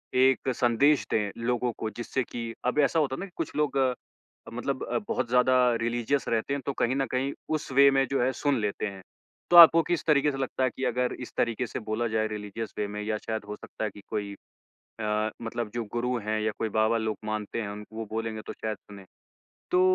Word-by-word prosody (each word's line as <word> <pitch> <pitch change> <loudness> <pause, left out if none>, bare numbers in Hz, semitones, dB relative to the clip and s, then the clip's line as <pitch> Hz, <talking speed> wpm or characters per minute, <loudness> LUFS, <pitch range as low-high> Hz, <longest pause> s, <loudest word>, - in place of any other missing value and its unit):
एक 130 +1 +4
संदेश 130 +5 +3
दें 105 -2 +1 0.2
लोगों 125 0 +1
को, 110 - -2
जिससे 120 +4 -3
कि 115 -1 -6
अब 125 +4 +1
ऐसा 150 +3 +3
होता 135 -3 +1
है - - -8
ना 195 - -4
कि 195 - -14
कुछ 165 - -4
लोग 150 -2 +1
अब 130 -2 -4
मतलब - - -2
अ, - - -1
बहुत - - -1
ज़्यादा 125 +1 +4 0.3
रिलीजियस 120 +4 0
रहते 115 +4 0
हैं, 140 - -2
तो 140 - -1
कहीं 130 +1 0
न 135 - +1
कहीं 130 +2 0 0.2
उस 150 -3 -5
वे 140 +1 +7
में 135 0 +3
जो 135 - +2
है 130 - +2
सुन 140 -1 0
लेते 105 0 -1
हैं। 95 -1 -8 0.5
तो 175 - +8
आपको 165 0 +10
किस 175 +1 -1
तरीके 150 -1 +4
से 135 - -5
लगता 130 0 -2
है 130 - +3
कि 130 - -7
अगर 125 +1 0
इस 125 - -7
तरीके 115 +1 0
से - - -5
बोला 115 +2 0
जाए, 110 0 0
रिलीजियस 105 +1 -6
वे 105 - 0
में, 105 +1 -5
या 110 0 -1
शायद 110 -1 -4
हो 105 - -4
सकता 110 - -8
है - - -1
कि 100 - -13
कोई 105 -2 -3 0.7
अ, 105 0 0
मतलब 115 -1 -3
जो 120 -1 -2
गुरु 125 +1 0
हैं 110 0 +1
या 110 0 0
कोई 110 - -1
बाबा 110 +1 +3
लोग 110 -1 -2
मानते 110 +1 -3
हैं 100 - -4
उनको 105 +1 -9
वो 115 -1 -4
बोलेंगे 110 -1 -3
तो - - -4
शायद 110 -1 -4
सुनें। 100 -2 -13 0.7
तो 180 - +4
120 Hz, 230 wpm, -28 LUFS, 110-135 Hz, 0.7 s, आपको